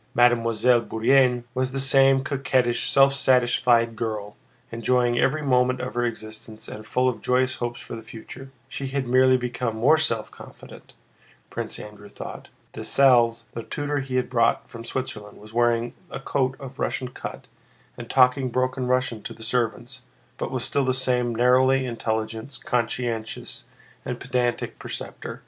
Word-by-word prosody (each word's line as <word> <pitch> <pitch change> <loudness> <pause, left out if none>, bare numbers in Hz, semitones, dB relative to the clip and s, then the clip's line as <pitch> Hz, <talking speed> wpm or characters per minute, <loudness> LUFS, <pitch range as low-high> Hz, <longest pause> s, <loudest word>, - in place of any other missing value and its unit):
Mademoiselle 120 0 +4
Bourienne 125 +2 +2
was 130 0 -1
the 135 - -1
same 135 0 +5
coquettish, 130 -4 0
self 135 0 +5
satisfied 120 -3 +3
girl, 105 -3 -4 0.4
enjoying 120 +1 +1
every 155 +3 +1
moment 125 -2 +2
of 125 0 -4
her 120 - 0
existence 110 -1 -7
and 110 0 -9
full 125 +4 +1
of 125 - -1
joyous 130 0 +1
hopes 120 0 -4
for - - -8
the 115 - -8
future. 115 +4 -11 0.2
She 135 0 -5
had 135 0 -2
merely 130 +1 +5
become 125 -2 -3
more 135 +8 +4
self 115 -9 +1
confident, - - -14 0.6
Prince - - -4
Andrew 105 -1 -11
thought. - - -9 0.3
Dessalles, 120 -4 +3
the 115 - -5
tutor 145 +4 -3
he 135 -1 -4
had 125 - +1
brought 115 -2 +1
from 115 -1 -10
Switzerland, 105 -5 -5
was 110 +1 -14
wearing 120 0 +1 0.2
a - - -6
coat 135 -1 -1
of 135 +1 -10
Russian 125 - -2
cut - - -8 0.5
and 120 -1 -9
talking 130 0 +4
broken 130 +1 -1
Russian 125 -3 0
to - - -8
the 110 - -11
servants, 120 +2 -2 0.4
but - - -2
was - - -3
still 140 - 0
the 130 -1 +1
same 125 -2 +1
narrowly 130 +2 +4
intelligent, 110 +1 -3
conscientious, 115 -2 -2 0.4
and - - -5
pedantic 120 -1 -2
preceptor. - - -7
125 Hz, 155 wpm, -24 LUFS, 115-130 Hz, 0.6 s, same